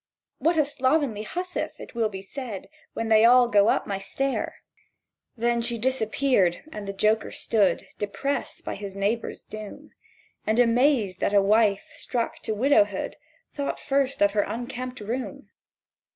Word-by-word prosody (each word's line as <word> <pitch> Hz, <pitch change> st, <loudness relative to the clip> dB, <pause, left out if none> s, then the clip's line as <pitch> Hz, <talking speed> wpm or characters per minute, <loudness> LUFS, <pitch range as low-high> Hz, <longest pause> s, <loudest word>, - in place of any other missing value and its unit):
'What 330 Hz, +1 st, +2 dB
a 305 Hz, -, +4 dB
slovenly 265 Hz, -5 st, 0 dB
hussif!' 360 Hz, +9 st, -4 dB
it -, -, -10 dB
will 230 Hz, -2 st, +1 dB
be 190 Hz, -2 st, -7 dB
said, 225 Hz, -2 st, -7 dB, 0.2 s
When 225 Hz, 0 st, -3 dB
they 220 Hz, 0 st, +6 dB
all 245 Hz, +1 st, +7 dB
go 205 Hz, -3 st, +4 dB
up -, -, +1 dB
my 195 Hz, -1 st, -3 dB
stair!" 270 Hz, +7 st, -2 dB, 0.8 s
She 235 Hz, 0 st, +1 dB
disappeared; 235 Hz, -5 st, +1 dB
and 210 Hz, -6 st, -7 dB
the -, -, -2 dB
joker 215 Hz, +2 st, +1 dB
stood 210 Hz, -4 st, +1 dB
Depressed 275 Hz, +7 st, -3 dB
by -, -, -3 dB
his 200 Hz, -1 st, -7 dB
neighbour's 205 Hz, +4 st, -2 dB
doom, 215 Hz, -1 st, -9 dB, 0.6 s
And 215 Hz, +1 st, +2 dB
amazed 240 Hz, -5 st, +3 dB
that 205 Hz, -, +1 dB
a -, -, +8 dB
wife 205 Hz, -1 st, +3 dB
struck 235 Hz, -2 st, -3 dB
to 220 Hz, -, -3 dB
widowhood 205 Hz, -5 st, +2 dB, 0.4 s
Thought 280 Hz, -1 st, -3 dB
first 275 Hz, -4 st, +1 dB
of 200 Hz, -, +4 dB
her 205 Hz, 0 st, +2 dB
unkempt 250 Hz, +2 st, -5 dB
room. 240 Hz, +5 st, -5 dB
230 Hz, 150 wpm, -26 LUFS, 205-260 Hz, 0.8 s, a